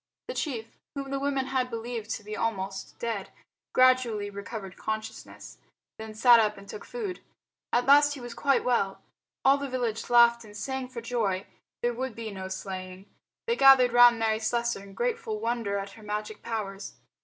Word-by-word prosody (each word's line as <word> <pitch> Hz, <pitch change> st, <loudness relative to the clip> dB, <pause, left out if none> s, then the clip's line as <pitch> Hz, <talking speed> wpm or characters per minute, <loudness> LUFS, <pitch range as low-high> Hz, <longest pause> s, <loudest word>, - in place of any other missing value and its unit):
The -, -, -2 dB
chief, 235 Hz, -, -4 dB, 0.2 s
whom 275 Hz, -1 st, -5 dB
the 275 Hz, -, -1 dB
women 275 Hz, -1 st, 0 dB
had 260 Hz, -1 st, -1 dB
believed 230 Hz, -1 st, -5 dB
to 215 Hz, -, -9 dB
be 210 Hz, +1 st, -6 dB
almost 195 Hz, -4 st, -3 dB
dead, 225 Hz, -5 st, -3 dB, 0.4 s
gradually 250 Hz, -5 st, +3 dB
recovered 200 Hz, -1 st, -7 dB
consciousness, 220 Hz, +1 st, -6 dB, 0.4 s
then 220 Hz, 0 st, -8 dB
sat 235 Hz, +1 st, +7 dB
up 210 Hz, -1 st, +1 dB
and 195 Hz, 0 st, -13 dB
took 440 Hz, -, -8 dB
food. 420 Hz, -7 st, -5 dB, 0.5 s
At 245 Hz, -, +2 dB
last 290 Hz, +1 st, +6 dB
he -, -, -9 dB
was 240 Hz, -1 st, -7 dB
quite 275 Hz, +2 st, +2 dB
well. 200 Hz, -6 st, 0 dB, 0.4 s
All 275 Hz, +1 st, +6 dB
the 280 Hz, -1 st, -4 dB
village 240 Hz, -4 st, -2 dB
laughed 235 Hz, -1 st, +6 dB
and 210 Hz, -1 st, -12 dB
sang 265 Hz, +1 st, -3 dB
for 250 Hz, -2 st, -7 dB
joy. 220 Hz, -5 st, -1 dB, 0.4 s
There 240 Hz, 0 st, +1 dB
would 255 Hz, -1 st, -4 dB
be 225 Hz, -2 st, -6 dB
no 190 Hz, -1 st, -6 dB
slaying. 190 Hz, 0 st, -6 dB, 0.4 s
They 465 Hz, -, +1 dB
gathered 265 Hz, -, +7 dB
round 245 Hz, -1 st, +8 dB
Mary 220 Hz, -1 st, +1 dB
Slessor 235 Hz, -1 st, -1 dB
in 195 Hz, -1 st, -13 dB
grateful 465 Hz, -3 st, -2 dB
wonder 230 Hz, -, -1 dB
at 200 Hz, 0 st, -5 dB
her 220 Hz, -, -14 dB
magic 210 Hz, 0 st, -5 dB
powers. 205 Hz, -3 st, -5 dB
230 Hz, 180 wpm, -28 LUFS, 210-255 Hz, 0.5 s, round